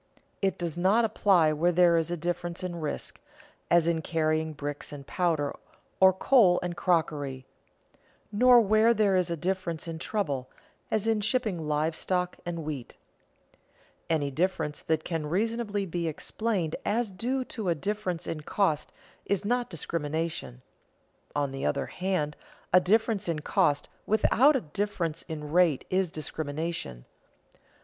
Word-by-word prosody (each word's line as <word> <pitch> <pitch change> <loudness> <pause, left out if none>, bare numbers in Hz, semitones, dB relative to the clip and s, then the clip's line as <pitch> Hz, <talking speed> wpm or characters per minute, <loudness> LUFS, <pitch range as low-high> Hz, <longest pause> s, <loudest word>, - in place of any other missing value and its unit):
It 195 -1 +1
does 175 -1 -3
not 205 +6 +4
apply 190 -7 +3
where 170 +4 +2
there 175 -1 +5
is 165 -1 +1
a 175 - -2
difference 175 +1 -3
in 175 -2 -4
risk, 150 - -5 0.5
as 170 -1 +4
in 165 -1 +1
carrying 155 -1 0
bricks 145 -1 -5
and 140 -2 -8
powder, 160 -5 0 0.4
or 190 0 +8
coal 190 -2 +4
and 175 -1 -3
crockery; 145 -7 0 0.9
nor 245 +3 +7
where 215 +2 +4
there 205 -3 +3
is 180 -1 +2
a 170 - -2
difference 175 -1 -2
in 165 -1 -5
trouble, 145 -11 -2 0.4
as 215 -1 0
in 225 -2 +2
shipping 210 -8 0
live 155 +2 0
stock 180 0 -1
and 170 -2 -3
wheat. 145 -6 -6 1.1
Any 150 -4 +1
difference 155 -1 -1
that 160 -1 0
can 165 -3 -3
reasonably 210 +2 -1
be 170 -1 -2
explained 180 +1 -2
as 220 0 0
due 255 +7 -1
to 215 -7 -4
a 170 - +2
difference 185 0 -3
in 155 - -4
cost 160 -1 0 0.4
is 200 0 0
not 245 +2 0
discrimination; 155 -5 -3 0.7
on 145 -2 0
the 135 0 -5
other - - 0
hand 180 -5 -2 0.4
a 180 - +9
difference 210 0 +1
in 165 - 0
cost 145 -1 +1 0.2
without 245 +7 +4
a 265 - +1
difference 170 -2 -2
in 150 -2 -7
rate 170 -5 +3
is 185 -1 +2
discrimination. 155 - -4
175 Hz, 145 wpm, -28 LUFS, 155-200 Hz, 1.1 s, a